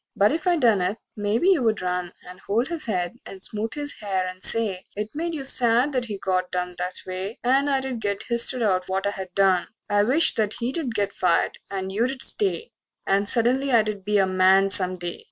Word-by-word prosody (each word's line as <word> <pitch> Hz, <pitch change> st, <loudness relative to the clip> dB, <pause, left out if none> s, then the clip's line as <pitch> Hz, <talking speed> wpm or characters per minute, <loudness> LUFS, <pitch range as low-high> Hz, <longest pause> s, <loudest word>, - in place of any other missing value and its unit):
But 205 Hz, +1 st, +3 dB
if 315 Hz, +3 st, -3 dB
I 350 Hz, -1 st, +3 dB
done 225 Hz, -, +3 dB
it, 185 Hz, +4 st, -1 dB, 0.2 s
maybe 210 Hz, -, +1 dB
you 360 Hz, -8 st, +4 dB
would 220 Hz, -4 st, 0 dB
run 180 Hz, -1 st, -2 dB, 0.2 s
And 180 Hz, +1 st, -11 dB
hold 225 Hz, +8 st, -1 dB
his 335 Hz, -7 st, -3 dB
head 180 Hz, -4 st, -2 dB
and 195 Hz, -, -10 dB
smooth 220 Hz, +4 st, -3 dB
his 290 Hz, -1 st, -4 dB
hair 190 Hz, -3 st, -2 dB
and 185 Hz, 0 st, -8 dB
say 200 Hz, -5 st, 0 dB
It 210 Hz, +1 st, -4 dB
made 330 Hz, +2 st, -3 dB
you 285 Hz, -, -5 dB
sad 250 Hz, +1 st, +4 dB
that 255 Hz, -3 st, -1 dB
he 210 Hz, -3 st, -5 dB
got 185 Hz, -1 st, -1 dB
dumped 180 Hz, -1 st, -4 dB
that 180 Hz, +1 st, -3 dB
way, 185 Hz, +4 st, -5 dB
And 270 Hz, +3 st, +2 dB
I'd 265 Hz, -4 st, -1 dB
get 200 Hz, -1 st, -2 dB
h'isted 235 Hz, +1 st, +1 dB
out 185 Hz, -3 st, +1 dB
for 190 Hz, -, -5 dB
what 195 Hz, +1 st, -1 dB
I 195 Hz, -2 st, -3 dB
done 190 Hz, -2 st, +3 dB, 0.2 s
I 205 Hz, 0 st, +4 dB
wish 265 Hz, +10 st, +3 dB
that 215 Hz, -1 st, -1 dB
he'd 250 Hz, +1 st, -3 dB
get 200 Hz, -1 st, -1 dB
fired 175 Hz, -2 st, +1 dB
and 190 Hz, -1 st, -4 dB
you'd 245 Hz, +6 st, -1 dB
stay 435 Hz, +3 st, 0 dB, 0.3 s
And 200 Hz, +1 st, +2 dB
suddenly 255 Hz, +4 st, +3 dB
I'd 215 Hz, -4 st, +1 dB
be 210 Hz, +1 st, +1 dB
a 195 Hz, -, +4 dB
man 190 Hz, +1 st, +3 dB
some 185 Hz, -2 st, +1 dB
day. 175 Hz, -1 st, -5 dB
210 Hz, 215 wpm, -24 LUFS, 190-250 Hz, 0.3 s, you